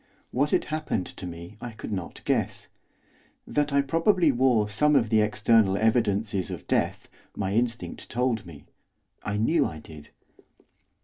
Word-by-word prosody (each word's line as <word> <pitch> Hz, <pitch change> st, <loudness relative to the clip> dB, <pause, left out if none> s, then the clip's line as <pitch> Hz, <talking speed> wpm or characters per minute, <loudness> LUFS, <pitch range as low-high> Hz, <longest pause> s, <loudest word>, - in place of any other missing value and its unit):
What 140 Hz, +3 st, +1 dB
had -, -, +1 dB
happened 155 Hz, -, -1 dB
to 90 Hz, -, -8 dB
me 85 Hz, +4 st, -9 dB
I 120 Hz, -2 st, -6 dB
could 110 Hz, -, -8 dB
not 95 Hz, -4 st, -5 dB
guess. -, -, -1 dB, 0.8 s
That 145 Hz, 0 st, 0 dB
I 140 Hz, 0 st, +3 dB
probably 165 Hz, +3 st, +3 dB
wore 120 Hz, -4 st, +3 dB
some 150 Hz, +9 st, +2 dB
of 115 Hz, -5 st, +3 dB
the 110 Hz, -1 st, +4 dB
external 105 Hz, -1 st, +3 dB
evidences 105 Hz, -3 st, +1 dB
of -, -, -7 dB
death -, -, 0 dB, 0.3 s
my 95 Hz, 0 st, -1 dB
instinct 115 Hz, +1 st, -2 dB
told 120 Hz, -2 st, 0 dB
me, 80 Hz, -6 st, -12 dB, 0.6 s
I 100 Hz, -, -3 dB
knew 115 Hz, +11 st, +3 dB
I 80 Hz, -, -7 dB
did. 75 Hz, -1 st, -12 dB
110 Hz, 150 wpm, -26 LUFS, 100-130 Hz, 0.8 s, the